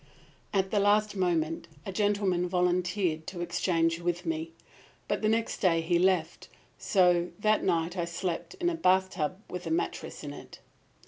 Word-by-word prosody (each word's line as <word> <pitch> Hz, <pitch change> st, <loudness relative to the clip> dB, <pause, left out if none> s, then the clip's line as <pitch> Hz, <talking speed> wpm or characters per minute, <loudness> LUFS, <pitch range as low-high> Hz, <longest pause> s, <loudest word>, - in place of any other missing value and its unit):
"At 190 Hz, -2 st, 0 dB
the 210 Hz, -, +2 dB
last 205 Hz, +1 st, +3 dB
moment 170 Hz, -3 st, 0 dB, 0.2 s
a -, -, -4 dB
gentleman 195 Hz, -3 st, +1 dB
volunteered 180 Hz, -2 st, 0 dB
to 175 Hz, -2 st, -5 dB
exchange 165 Hz, -1 st, +1 dB
with 175 Hz, +1 st, -2 dB
me. 165 Hz, 0 st, -2 dB, 0.6 s
But -, -, -1 dB
the 215 Hz, -, +2 dB
next 225 Hz, +1 st, 0 dB
day 170 Hz, -4 st, +3 dB
he 170 Hz, +1 st, +1 dB
left, 180 Hz, -3 st, +1 dB, 0.3 s
so 180 Hz, -3 st, +3 dB
that 215 Hz, 0 st, +2 dB
night 170 Hz, -1 st, 0 dB
I 175 Hz, -2 st, -1 dB
slept 170 Hz, -, -4 dB
in 355 Hz, -2 st, -1 dB
a -, -, -2 dB
bathtub 185 Hz, -, +1 dB
with 180 Hz, -1 st, -6 dB
a -, -, -2 dB
mattress 165 Hz, 0 st, -3 dB
in 145 Hz, -1 st, -6 dB
it! -, -, -11 dB
180 Hz, 160 wpm, -29 LUFS, 170-195 Hz, 0.6 s, last